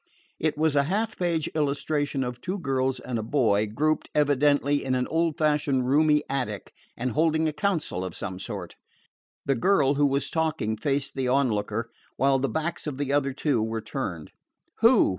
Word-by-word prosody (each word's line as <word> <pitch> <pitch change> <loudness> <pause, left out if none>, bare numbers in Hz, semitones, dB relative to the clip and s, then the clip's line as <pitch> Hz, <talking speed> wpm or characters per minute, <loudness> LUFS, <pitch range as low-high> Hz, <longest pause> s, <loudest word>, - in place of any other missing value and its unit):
It 155 -1 0
was 155 -1 +2
a 140 -1 +3
half 215 +7 -1
page 170 -4 0
illustration 145 -1 0
of 125 -1 -5
two 185 +2 -3
girls 135 -5 -1
and 125 -2 -3
a - - -1
boy, 110 -4 +2
grouped, 155 +9 0
evidently, 145 0 +3
in 130 -1 0
an 125 0 0
old 165 -1 0
fashioned 150 -5 +1
roomy 150 +2 +4
attic, 115 -8 -3 0.2
and 125 +1 -2
holding 160 +3 +2
a 155 - -1
council 165 - -1
of 95 - -6
some 95 -2 -5
sort. - - -6 0.7
The 140 - +2
girl 140 +1 +3
who 145 0 +3
was 140 0 -1
talking 155 -9 0
faced 140 +4 -1
the 135 -2 -2
onlooker, 115 -3 0 0.3
while 135 0 +3
the 135 - 0
backs 160 +1 -3
of 140 -3 -4
the 140 -1 -1
other 140 -1 +2
two 135 -3 0
were 110 +1 -2
turned. 105 - -5 0.5
"Who?" - - +5
140 Hz, 180 wpm, -26 LUFS, 125-155 Hz, 0.7 s, Who